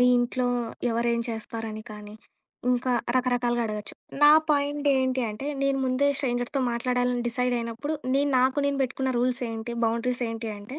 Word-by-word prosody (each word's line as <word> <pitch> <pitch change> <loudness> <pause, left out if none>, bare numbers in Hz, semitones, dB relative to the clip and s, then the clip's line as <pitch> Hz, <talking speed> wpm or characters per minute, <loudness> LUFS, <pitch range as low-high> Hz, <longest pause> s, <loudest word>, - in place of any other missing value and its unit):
మీ 250 - +6
ఇంట్లో 245 +1 0 0.4
ఎవరేం 235 0 +1
చేస్తారని 220 0 -5
కానీ, 210 0 -10 0.6
ఇంకా 250 +1 0 0.3
రకరకాలుగా 245 -1 +1
అడగొచ్చు. 210 -1 -5 0.3
నా 295 - +9 0.2
పాయింట్ 290 0 +1
ఏంటి 260 -1 +1
అంటే 240 +7 -6 0.2
నేను 275 0 +2
ముందే 255 +3 +2
స్ట్రేంజర్స్‌తో 245 0 -1
మాట్లాడాలని 245 0 0
డిసైడయినప్పుడు, 245 +3 -1 0.2
నేను 285 0 +2
నాకు 260 +2 +2
నేను 280 -1 0
పెట్టుకున్న 260 +1 -2
రూల్సేంటి, 240 -2 -2
బౌండరీసేంటి 230 -1 -2
అంటే, 255 +9 -9
245 Hz, 135 wpm, -26 LUFS, 230-260 Hz, 0.6 s, నా